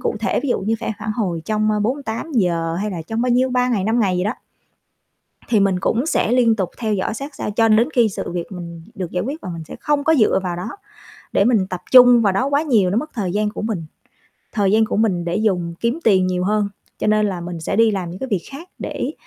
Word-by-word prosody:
cụ - - -1
thể - - 0
ví 285 - -3
dụ - - +1
như 215 +4 0
sẽ 225 - -2
phản 215 0 -3
hồi 180 -8 -2
trong, 215 0 0
ơ, 210 -1 0
48 250 +4 -3
giờ 170 - +1
hay 210 - -2
là 170 -3 -5
trong 225 +7 -3
bao 250 - +1
nhiêu, 255 +2 +2
3 250 0 +1
ngày, 205 -6 0
5 225 +3 +1
ngày 190 -4 +1
gì 180 - 0
đó, 210 - 0 1.2
thì 220 -3 +3
mình 195 -2 +2
cũng 235 +8 0
sẽ 240 - +1
liên 235 -3 +4
tục 190 -4 -2
theo 220 -3 -1
dõi 200 +3 -1
sát 275 +5 -7
sao - - -4
cho 225 +2 +3
đến 225 +6 +4
khi 235 -4 +4
sự 185 - -5
việc 175 +1 -5
mình 170 -3 -8
được 180 -3 -5
giải 180 - -1
quyết 285 +7 -5
và 185 - -6
mình 165 - -7
sẽ - - -8
không 290 -1 +1
có 320 +1 +4
dựa 215 -5 +3
vào 175 -1 -2
đó 180 - -5 0.6
để 200 - +3
mình 215 -5 +3
tập 180 - -4
trung 245 -2 +8
vào 200 -3 +3
đó 250 +8 0
quá 285 +2 +2
nhiều, 220 - +2
nó 200 - 0
mất 305 +4 -4
thời 195 -6 -2
gian 210 +1 0
của 210 - -6
mình. 210 -7 -3 0.7
Thời 200 -3 +1
gian 220 +1 +4
của - - -2
mình 190 -6 +1
để 170 - -1
dùng 180 -6 0
kiếm 235 +7 0
tiền 190 -4 +4
nhiều 180 0 -1
hơn, 210 +1 +1 0.3
cho - - -2
nên 215 0 +3
là 185 -4 -3
mình 170 -1 -6
sẽ 160 - -2
đi 225 0 +5
làm 185 -4 -3
những 180 - -8
cái 265 - -5
việc 200 -7 -1
khác 315 +6 -10
để 280 - -4
215 Hz, 270 wpm, -20 LUFS, 185-240 Hz, 1.2 s, trung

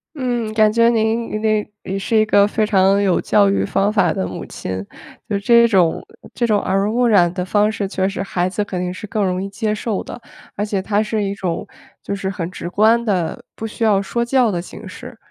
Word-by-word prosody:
嗯， 245 -5 -2
感 215 -1 +4
觉 230 +1 +4
您 225 0 0
您 215 -1 +1 0.2
也 195 +1 -3
是 210 +3 -2
一 215 - +4
个 205 -2 +4
非 215 +1 0
常 195 -1 +3
有 195 -3 +2
教 205 -1 +3
育 195 - +1
方 200 +1 +1
法 185 -6 +3
的 95 - -2
母 - - -6
亲， 95 0 -5 0.5
就 205 - 0
这 235 +3 +5
种 185 -7 +2 0.3
这 235 - 0
种 210 -2 +2
耳 190 0 -1
濡 210 - 0
目 245 +2 +2
染 180 -6 +4
的 180 -1 -3
方 210 +3 +2
式 205 -2 -3
确 190 -1 -1
实 195 - -4
孩 180 -2 -1
子 205 +2 -2
肯 185 -3 -4
定 180 0 -2
是 185 +3 -8
更 210 0 -1
容 185 0 -1
易 - - -4
接 210 +2 -2
受 215 -1 -3
的， - - -9 0.4
而 205 - -1
且 205 -2 -2
他 205 +2 0
是 215 0 -2
一 200 0 -2
种 180 -4 -3 0.3
就 200 - -4
是 195 -1 -3
很 175 -3 -4
直 180 - -7
观 220 +5 +3
的， 180 -7 -1
不 225 - -5
需 225 - -5
要 205 -3 +3
说 235 +4 -2
教 250 -1 +3
的 175 - -2
形 - - -11
式。 - - -10
205 Hz, 250 characters per minute, -19 LUFS, 190-220 Hz, 0.5 s, 这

